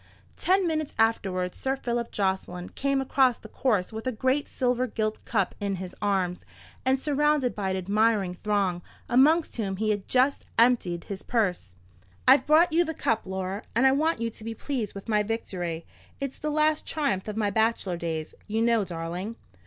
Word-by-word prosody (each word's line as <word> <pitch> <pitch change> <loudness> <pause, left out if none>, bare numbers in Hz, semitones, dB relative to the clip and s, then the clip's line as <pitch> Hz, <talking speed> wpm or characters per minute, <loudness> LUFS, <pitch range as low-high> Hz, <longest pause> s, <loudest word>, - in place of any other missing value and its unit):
Ten 380 +1 +2
minutes 310 -3 -1
afterwards 190 -5 +1
Sir 265 0 0
Philip 240 -3 -2
Jocelyn 190 -2 -2
came 275 0 0
across 265 -2 +3
the - - -12
course 220 -4 0
with 220 +3 -5
a - - +2
great 260 +5 0
silver 250 -1 0
gilt 215 -1 -2
cup 200 -5 0
in 200 -1 -1
his 185 0 -7
arms, 190 -3 0 0.4
and 260 +1 +2
surrounded 295 -2 +2
by 195 -2 -2
an 190 - -1
admiring 200 0 +2
throng, 195 -2 0 0.3
amongst 305 +6 +4
whom 195 -4 -1
he 215 +2 0
had 205 -2 -3
just 260 +2 +2
emptied 225 -8 +3
his 195 -2 -6
purse. 180 - -1 0.5
"I've 265 +3 +6
brought 315 +2 +5
you 340 +2 +5
the 320 -1 -4
cup, 225 -6 0
Laura; 190 +1 -3
and 245 +3 +4
I 265 - +7
want 310 +1 +1
you 230 0 -1
to 220 - -12
be 225 0 -5
pleased 235 -6 -3
with 195 - -8
my 210 -2 +3
victory. 180 -6 -3 0.3
It's 275 -1 -4
the 305 - -2
last 305 0 +1
triumph 210 -12 -1
of 215 0 -4
my 210 -2 +1
bachelor 220 -3 +1
days, 160 -2 -4
you 220 +2 0
know, 230 -2 +3
darling." 175 +4 -5
225 Hz, 185 wpm, -27 LUFS, 190-265 Hz, 0.5 s, I